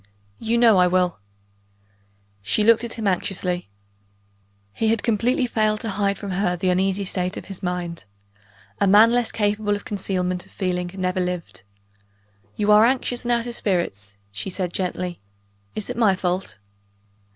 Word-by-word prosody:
"You 230 +1 0
know 230 -4 +6
I 180 0 +5
will!" 180 - +1 1.2
She 100 - +1
looked 230 +1 +5
at 235 - -4
him 225 - -4
anxiously. 180 - -1 1.0
He 225 - -1
had 225 -1 +1
completely 245 +4 +1
failed 215 -2 +1
to 225 - -3
hide 200 0 0
from 200 -1 -6
her 180 -1 0
the 185 +1 +1
uneasy 190 +2 +1
state 185 0 -2
of - - -7
his 195 -2 -9
mind: 175 - -4 0.7
a 200 - +3
man 210 +4 +7
less 240 -1 +1
capable 205 0 0
of 205 - -8
concealment 185 -3 -2
of - - -23
feeling 180 -2 -2
never 185 -1 -1
lived. 180 - -3 0.9
"You 210 0 +2
are 210 +1 +7
anxious, 245 0 +1
and 240 - 0
out 235 -1 +1
of 240 - -4
spirits," 105 - -1 0.2
she 100 - -4
said 180 -2 -3
gently. 180 -1 -2 0.6
"Is 215 - -4
it - - -5
my 215 -5 +4
fault?" 180 - -2
195 Hz, 165 wpm, -23 LUFS, 180-215 Hz, 1.2 s, man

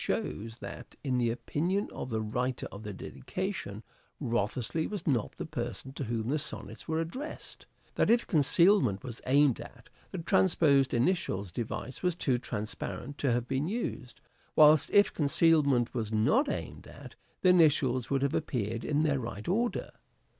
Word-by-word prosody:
shows 110 +2 -3
that, - - -9
in 130 -3 0
the 120 -1 +2
opinion 155 - -1
of - - -5
the 110 -2 -1
writer 125 +4 -2
of 100 - -9
the 105 -1 -6
dedication, 120 - -5 0.4
Wriothesley 120 +4 -1
was 205 -5 -5
not 125 -8 0
the - - -4
person 125 -3 -5
to 140 - -4
whom 115 0 -2
the 150 +3 +1
Sonnets 110 -6 -4
were 160 0 0
addressed; 215 - -6 0.3
that, - - +1
if 235 +1 +4
concealment 150 - +3
was 120 -3 -7
aimed 140 -1 +4
at, - - -13 0.2
the - - -6
transposed 155 -6 +3
initials 115 - 0
device 120 +5 -5
was 180 -2 +1
too 130 -7 0
transparent 120 +5 -5
to 140 - +1
have 120 0 0
been 135 +4 -1
used: 180 - -4 0.4
whilst 150 -1 +6
if 205 -1 +4
concealment 140 -5 +3
was 110 -4 -3
not 220 - +3
aimed - - -5
at, - - -12 0.3
the 185 - +6
initials 145 -8 +4
would 135 -1 +1
have 140 - +1
appeared 115 -1 -2
in 150 +1 +1
their 145 -3 +1
right 110 -4 -6
order. 230 +6 0
135 Hz, 160 wpm, -30 LUFS, 115-160 Hz, 0.4 s, whilst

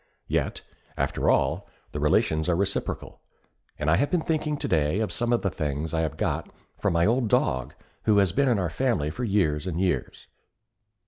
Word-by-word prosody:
Yet, - - -1 0.3
after - - 0
all, - - +1 0.2
the - - -4
relations 80 +2 +2
are 85 - +3
reciprocal; 100 +3 -2 0.6
and 75 - -3
I 80 +2 +4
have 145 - +1
been 175 -3 +1
thinking 155 -2 -1
today 80 - +1
of 110 - -1
some 120 -2 -1
of 120 - +2
the 95 - +1
things 75 0 -3
I 80 - +1
have 80 -3 -2
got - - -1 0.3
from - - 0
an 85 +2 +4
old 120 +1 +2
dog 65 - +1 0.3
who 105 -2 +4
has 100 -3 +4
been 140 +7 +2
in 120 - +3
our 90 -4 -1
family 110 - 0
for 125 - -5
years 95 -7 +1
and 85 -2 -2
years. 90 -9 -1
95 Hz, 190 wpm, -26 LUFS, 80-120 Hz, 0.6 s, I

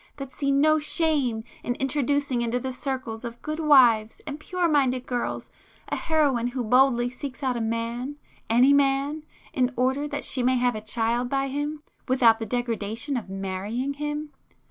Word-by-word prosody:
—that 275 -2 -7
see 280 -1 -2
no 310 +3 +4
shame 295 -7 +1 0.2
in 245 - -2
introducing 275 -1 0
into 235 +1 0
the 260 +1 -4
circles 255 -4 -4
of 235 0 -7
good 310 +1 -4
wives 245 -8 +5
and 295 0 -6
pure 360 +2 -1
minded 260 -5 +1
girls, 245 -1 -3 0.4
a - - -1
heroine 285 -7 +1
who 245 0 -3
boldly 245 +1 +4
seeks 260 +2 -7
out 255 -2 0
a 235 - -2
man, 230 +4 -3 0.3
any 250 +5 +5
man, 280 +2 +2 0.3
in 255 -1 +1
order 265 +4 0
that 285 -1 -4
she 260 - 0
may 255 +1 +3
have 245 0 +2
a 215 - -5
child 230 +3 -1
by 275 0 0
him, 290 +2 -3 0.2
without 240 -4 +4
the 225 - -4
'degradation' 235 +2 -2
of 225 -6 -4
marrying 195 +7 -3
him? 295 +1 -4
255 Hz, 170 wpm, -25 LUFS, 235-285 Hz, 0.4 s, wives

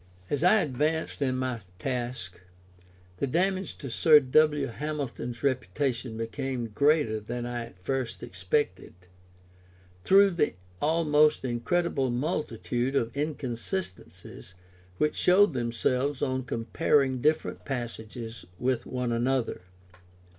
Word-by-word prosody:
As 145 +2 0
I 210 +4 +6
advanced 150 +3 -1
in 130 -2 +1
my 130 -3 -2 0.2
task, 120 -5 -4 0.8
the 140 - -1
damage 185 +6 0
to 135 - -7
Sir 150 +5 +7
W. 150 +1 +3
Hamilton's 125 -4 -5
reputation 130 -3 -1
became 120 +1 -3
greater 140 -1 +2
than 120 +3 -5
I 120 -1 -3
at 115 - -16
first 130 -1 -2
expected, 90 - -2 1.1
through 195 +1 +6
the 170 - 0 0.3
almost 150 -2 +3
incredible 135 +3 0
multitude 125 -2 -2
of 115 -2 0
inconsistencies 140 - -5 0.4
which 150 - +1
showed 185 -1 +5
themselves 125 +3 0
on 130 -2 -1
comparing 130 +1 +1
different 155 +3 0
passages 115 -3 -6
with 125 +1 -1
one 125 -1 -2
another. 120 -1 0
130 Hz, 110 wpm, -28 LUFS, 120-150 Hz, 1.1 s, Sir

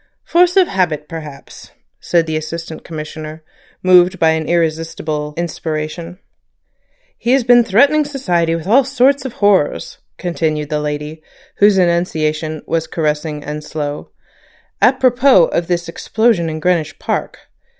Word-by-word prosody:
"Force 355 +2 +3
of 370 -2 +5
habit 160 -6 -1
perhaps," 155 -4 -10 0.3
said 170 -2 +1
the 160 -1 -3
Assistant 160 +1 -6
Commissioner, 155 0 -8 0.4
moved 185 0 +5
by 160 -2 +3
an 160 -1 -2
irresistible 155 -2 -2
inspiration. 165 +1 -4 1.0
"He 240 - +1
has 270 -2 +3
been 240 0 +5
threatening 280 +9 +3
society 180 - -1
with 165 -1 -6
all 240 +8 +4
sorts 270 +1 +2
of 260 - -5
horrors," 200 -9 +1 0.2
continued 155 -4 -2
the 150 - 0
lady, 150 +1 -5 0.4
whose 205 -1 +5
enunciation 160 -3 0
was 165 -1 -2
caressing 150 -1 -2
and 150 +1 -6
slow, 150 -1 -5 0.7
"apropos 255 -5 +4
of 170 +1 -2
this 175 -1 -1
explosion 205 0 0
in 155 0 -5
Greenwich 170 -2 0
Park. - - -3
165 Hz, 130 wpm, -17 LUFS, 155-205 Hz, 1.0 s, of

